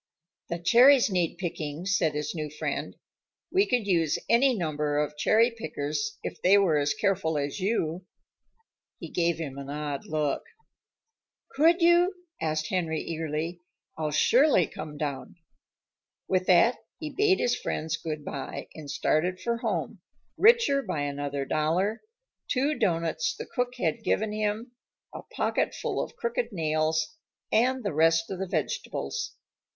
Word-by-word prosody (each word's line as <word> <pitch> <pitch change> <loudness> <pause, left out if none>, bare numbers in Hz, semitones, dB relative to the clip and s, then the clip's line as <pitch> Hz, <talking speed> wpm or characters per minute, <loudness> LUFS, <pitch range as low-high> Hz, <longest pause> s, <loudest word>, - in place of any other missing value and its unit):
"The 170 - -2
cherries 240 +7 +6
need 175 -3 0
picking," 160 -2 -4
said 175 -6 +1
his 150 0 -2
new 155 -3 -4
friend. 150 - -4 0.6
"We 390 +2 +3
could 245 -4 +1
use 165 -6 +2
any 255 +2 +4
number 150 -4 -1
of 150 0 -1
cherry 220 +10 +3
pickers, 155 0 -4
if - - -6
they 195 +3 +6
were 175 -7 +3
as 145 0 0
careful 185 -6 0
as 145 +5 -2
you." 185 -3 -1 0.9
He - - -8
gave 170 -1 +1
him 140 -4 -5
an 140 0 -8
odd 145 -1 -4
look. 155 -2 0 1.1
"Could 335 +5 +4
you?" 350 +3 +5 0.3
asked 155 0 -1
Henry 165 -4 -1
eagerly. 165 +1 -4 0.3
"I'll 155 -1 -2
surely 235 - +4
come 150 -1 -8
down." 145 +1 -4 0.9
With 185 -1 +1
that, 190 +7 +5 0.2
he 310 -2 -6
bade 390 +2 +3
his 245 - +1
friends 160 +1 -2
good 155 -3 -5
by 140 - -6
and 150 -2 -9
started 155 +6 0
for 235 +3 -1
home, - - -3 0.4
richer 445 - +5
by 155 - -3
another 145 -1 -3
dollar, 170 - 0 0.5
two 280 +3 +1
doughnuts 165 - 0
the - - -6
cook 245 0 -2
had 165 -10 -1
given 215 0 0
him, 215 +3 -2 0.4
a - - -7
pocket - - -1
full - - -2
of - - -9
crooked 470 +1 -2
nails, 160 -1 0 0.3
and 255 +3 +2
the 200 - -2
rest 165 +2 +3
of 190 - -4
the 190 - -2
vegetables. 415 - -3
170 Hz, 145 wpm, -27 LUFS, 155-230 Hz, 1.1 s, cherries